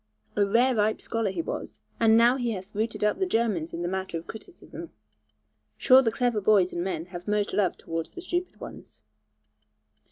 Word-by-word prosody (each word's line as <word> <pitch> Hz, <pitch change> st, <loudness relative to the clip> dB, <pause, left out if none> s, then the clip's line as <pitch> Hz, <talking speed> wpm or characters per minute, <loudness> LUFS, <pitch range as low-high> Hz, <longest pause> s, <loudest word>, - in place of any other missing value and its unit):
A 205 Hz, -, +3 dB
rare 235 Hz, +6 st, +3 dB
ripe 215 Hz, -1 st, +1 dB
scholar 225 Hz, -3 st, -2 dB
he 195 Hz, -, -3 dB
was; -, -, -6 dB, 0.2 s
and 225 Hz, -1 st, +5 dB
now 235 Hz, +2 st, +5 dB
he 240 Hz, -3 st, -1 dB
hath 190 Hz, -1 st, -8 dB
routed 215 Hz, +1 st, -2 dB
up 210 Hz, -, +1 dB
the 380 Hz, -, +1 dB
Germans 215 Hz, -, 0 dB
in 170 Hz, +1 st, -5 dB
the -, -, -1 dB
matter 190 Hz, -1 st, -3 dB
of 165 Hz, -, -8 dB
criticism. 285 Hz, -, -10 dB, 0.9 s
Sure 260 Hz, 0 st, +6 dB
the 230 Hz, -4 st, +1 dB
clever 240 Hz, -2 st, 0 dB
boys 195 Hz, -3 st, +3 dB
and 175 Hz, -, -2 dB
men 175 Hz, -3 st, -3 dB
have 175 Hz, +2 st, -8 dB
most 210 Hz, 0 st, 0 dB
love 195 Hz, -4 st, +1 dB
towards 165 Hz, 0 st, -5 dB
the 355 Hz, -, -10 dB
stupid 355 Hz, 0 st, -3 dB
ones. -, -, -11 dB
210 Hz, 190 wpm, -26 LUFS, 185-235 Hz, 0.9 s, Sure